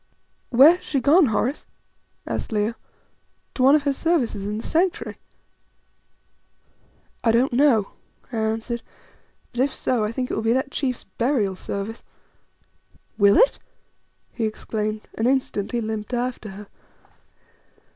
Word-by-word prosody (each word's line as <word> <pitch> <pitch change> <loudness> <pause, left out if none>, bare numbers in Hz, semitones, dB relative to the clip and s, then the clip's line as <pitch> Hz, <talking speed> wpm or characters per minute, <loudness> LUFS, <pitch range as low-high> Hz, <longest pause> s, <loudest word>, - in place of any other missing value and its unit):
"Where 280 +8 +7
has - - -20
she 280 - -1
gone, 295 +5 +5
Horace?" 245 +5 -1 0.6
asked - - -4
Leo. 215 +1 0 0.8
"To - - -3
one 270 +3 +7
of 300 - +2
her 285 -1 +1
services 265 - 0
in 210 +1 -3
the 225 - -5
Sanctuary?" 345 +3 -1 2.0
"I 230 - +4
don't 240 +3 +2
know," 240 -6 +3 0.4
I 235 - -4
answered; 225 +2 -2 0.7
"but 240 - -7
if 270 0 0
so, 245 -4 0
I 210 - -1
think 250 +1 -3
it - - -2
will - - -1
be 225 +1 +2
that 265 +2 -1
chief's 255 -4 -2
burial 220 -1 -1
service." 200 +4 -5 1.2
"Will 200 0 +6
it?" - - +4 0.7
he 230 - -1
exclaimed, 215 0 -3
and 225 - 0
instantly 245 -3 0
limped 220 +1 -4
after 245 -3 -3
her. 200 +1 -10
235 Hz, 135 wpm, -23 LUFS, 215-270 Hz, 2.0 s, Where